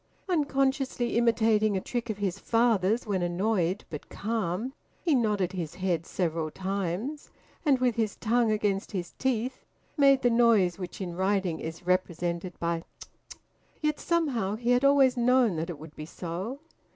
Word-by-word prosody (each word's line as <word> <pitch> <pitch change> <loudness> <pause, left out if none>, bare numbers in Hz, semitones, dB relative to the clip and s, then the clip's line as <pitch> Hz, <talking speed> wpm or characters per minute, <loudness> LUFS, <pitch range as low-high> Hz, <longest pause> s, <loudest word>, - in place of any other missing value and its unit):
Unconsciously 270 -6 0
imitating 220 -3 +3
a - - +1
trick 240 +4 -4
of 215 - -2
his 200 -2 -2
father's 225 -1 +2
when 200 -4 -1
annoyed 180 +1 0
but 150 - -7
calm, 220 +2 -2 0.3
he 330 - +3
nodded 210 -7 +1
his 170 -5 -5
head 180 -3 -1
several 165 -3 -1
times, 195 - -3 0.4
and 275 -2 +5
with 250 -1 +2
his 220 -3 0
tongue 230 0 +2
against 205 -1 -1
his 175 -3 -3
teeth 255 -1 -1 0.3
made 275 -2 +5
the 245 - +4
noise 225 -7 +4
which 180 +1 -6
in 175 -2 -4
writing 190 -2 0
is 160 +2 -7
represented 175 -1 -1
by 170 0 0
`tut - - -13 0.2
tut.' - - -14 0.4
Yet 300 -1 0
somehow 260 - 0
he 240 +2 0
had 245 +2 +3
always 275 -2 +5
known 245 -4 +3
that 160 +2 -3
it 170 - -5
would 155 +1 -12
be 155 - -7
so. 185 - -5
210 Hz, 165 wpm, -28 LUFS, 180-245 Hz, 0.4 s, and